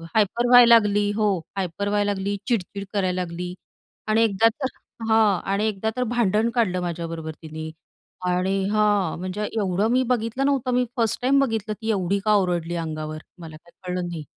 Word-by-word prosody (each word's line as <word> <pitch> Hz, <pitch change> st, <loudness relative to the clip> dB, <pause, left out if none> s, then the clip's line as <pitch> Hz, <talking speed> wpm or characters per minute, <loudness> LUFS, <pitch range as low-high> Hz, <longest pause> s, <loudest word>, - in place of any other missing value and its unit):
Hyper 220 Hz, +3 st, +2 dB
व्हायला 245 Hz, -1 st, +9 dB
लागली 205 Hz, -2 st, +2 dB
हो 215 Hz, -1 st, +2 dB, 0.3 s
हायपर 195 Hz, +2 st, -2 dB
व्हायला 205 Hz, 0 st, +1 dB
लागली, 200 Hz, +1 st, -2 dB
चिडचिड 200 Hz, -4 st, -2 dB
करायला 185 Hz, -2 st, 0 dB
लागली 180 Hz, +1 st, -5 dB, 0.5 s
आणि 220 Hz, +1 st, +3 dB
एकदा 220 Hz, 0 st, +3 dB
तर 265 Hz, +4 st, -3 dB, 0.4 s
हां 215 Hz, -4 st, +4 dB
आणि 210 Hz, +2 st, +1 dB
एकदा 215 Hz, +1 st, -2 dB
तर 250 Hz, -, +1 dB
भांडण 220 Hz, 0 st, +2 dB
काढलं 185 Hz, -7 st, +1 dB
माझ्याबरोबर 165 Hz, -2 st, -4 dB
तिने. 160 Hz, 0 st, -7 dB, 0.6 s
आणि 190 Hz, +2 st, 0 dB
हां 205 Hz, -5 st, +1 dB
म्हणजे 185 Hz, +3 st, -4 dB
एवढं 200 Hz, +1 st, +1 dB
मी 255 Hz, +1 st, +3 dB
बघितलं 245 Hz, +2 st, -1 dB
नव्हतं 270 Hz, -3 st, +1 dB
मी 250 Hz, 0 st, +2 dB
फर्स्ट 230 Hz, +1 st, 0 dB
टाईम 270 Hz, +2 st, +3 dB
बघितलं 220 Hz, -2 st, -3 dB
ती 220 Hz, -, -3 dB
एवढी 195 Hz, -1 st, 0 dB
का 215 Hz, -, +4 dB
ओरडली 175 Hz, -3 st, 0 dB
अंगावर. 155 Hz, -2 st, -4 dB, 0.2 s
मला 160 Hz, -2 st, -9 dB
काही 170 Hz, +2 st, -24 dB
कळलं 180 Hz, -1 st, -2 dB
नाही. 165 Hz, -3 st, -6 dB
200 Hz, 170 wpm, -23 LUFS, 180-225 Hz, 0.6 s, व्हायला